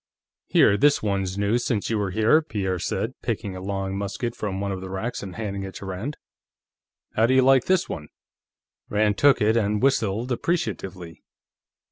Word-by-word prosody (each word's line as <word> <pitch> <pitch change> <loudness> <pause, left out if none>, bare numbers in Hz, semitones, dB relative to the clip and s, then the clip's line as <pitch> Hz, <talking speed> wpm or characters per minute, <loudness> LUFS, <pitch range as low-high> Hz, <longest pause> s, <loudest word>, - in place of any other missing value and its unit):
"Here, 100 - +5
this 145 0 +3
one's 95 -2 -1
new 100 +4 +1
since 115 -3 -1
you 110 - +1
were 100 -2 -1
here," 110 - +4
Pierre 95 - -2
said, - - -2
picking 95 -2 -3
a 95 - -7
long 95 0 -3
musket 100 +4 -3
from 100 -4 -3
one 100 0 -2
of 95 -1 -4
the 95 - -7
racks 110 +6 -4
and 95 -3 -7
handing 100 -3 -4
it 95 -1 -7
to - - -8
Rand. 95 +10 -5 1.0
"How 110 +1 +3
do 130 - +3
you 130 - +5
like 135 -1 +5
this 185 -1 +2
one?" 75 - -6 0.8
Rand 105 -1 +1
took 140 -1 +5
it 110 +2 +3
and 105 -2 +1
whistled 120 -2 +1
appreciatively. 95 - -3
105 Hz, 180 wpm, -24 LUFS, 95-120 Hz, 1.0 s, Here